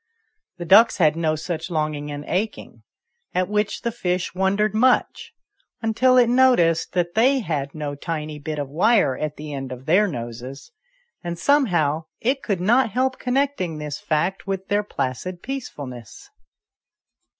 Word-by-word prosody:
The 175 Hz, -, -6 dB
ducks 215 Hz, +6 st, +6 dB
had 155 Hz, -5 st, +3 dB
no 160 Hz, -1 st, 0 dB
such 165 Hz, +1 st, -4 dB
longing 155 Hz, -3 st, -2 dB
and 145 Hz, 0 st, -6 dB
aching, 205 Hz, +5 st, -3 dB, 0.5 s
at 185 Hz, 0 st, +1 dB
which 210 Hz, +1 st, -1 dB
the 235 Hz, -, -1 dB
fish 180 Hz, -5 st, -2 dB
wondered 195 Hz, +3 st, +1 dB
much, 250 Hz, +4 st, +2 dB, 0.5 s
until 250 Hz, +3 st, +3 dB
it 245 Hz, -, +7 dB
noticed 245 Hz, -10 st, +3 dB
that 175 Hz, -1 st, 0 dB
they 260 Hz, +4 st, +3 dB
had 145 Hz, -8 st, -3 dB
no 150 Hz, -2 st, -4 dB
tiny 150 Hz, 0 st, -5 dB
bit 150 Hz, +1 st, -5 dB
of 145 Hz, -1 st, -3 dB
wire 180 Hz, -, +3 dB
at 150 Hz, +2 st, -4 dB
the 150 Hz, 0 st, -7 dB
end 135 Hz, -2 st, -5 dB
of 125 Hz, +1 st, -8 dB
their 190 Hz, +7 st, +4 dB
noses, 125 Hz, -, -7 dB, 0.5 s
and 170 Hz, -1 st, -4 dB
somehow 170 Hz, -, +2 dB
it 265 Hz, +3 st, 0 dB
could 195 Hz, -5 st, -2 dB
not 235 Hz, +6 st, +3 dB
help 260 Hz, +4 st, -1 dB
connecting 250 Hz, -, -1 dB
this 150 Hz, -1 st, -5 dB
fact 180 Hz, +5 st, -1 dB
with 195 Hz, -1 st, -4 dB
their 205 Hz, +1 st, +2 dB
placid 175 Hz, 0 st, -4 dB
peacefulness. 135 Hz, -, -7 dB
175 Hz, 150 wpm, -22 LUFS, 150-220 Hz, 0.5 s, it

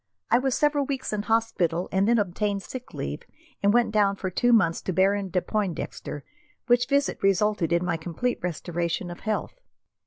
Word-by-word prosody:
I 235 Hz, -, +6 dB
was 265 Hz, -1 st, 0 dB
several 295 Hz, -2 st, +2 dB
weeks 270 Hz, -5 st, -3 dB
in 210 Hz, -, 0 dB
hospital, 210 Hz, -6 st, 0 dB
and 190 Hz, +2 st, +2 dB
then 235 Hz, +1 st, +4 dB
obtained 200 Hz, 0 st, -1 dB
sick 250 Hz, +7 st, -8 dB
leave -, -, -4 dB, 0.4 s
and 200 Hz, 0 st, +4 dB
went 240 Hz, 0 st, +3 dB
down 205 Hz, -2 st, +3 dB
for 190 Hz, -1 st, -4 dB
two 245 Hz, +7 st, +2 dB
months 190 Hz, -8 st, +3 dB
to 185 Hz, -, -3 dB
Baron 195 Hz, +2 st, +2 dB
de 180 Hz, 0 st, 0 dB
Pointdexter, 185 Hz, -7 st, -3 dB, 0.4 s
which 245 Hz, 0 st, +3 dB
visit 280 Hz, +1 st, +1 dB
resulted 195 Hz, -3 st, +2 dB
in 170 Hz, +1 st, +2 dB
my 170 Hz, -2 st, 0 dB
complete 175 Hz, +10 st, -2 dB
restoration 175 Hz, 0 st, -2 dB
to 175 Hz, -, -9 dB
health. 215 Hz, -, -3 dB
200 Hz, 180 wpm, -26 LUFS, 180-235 Hz, 0.4 s, I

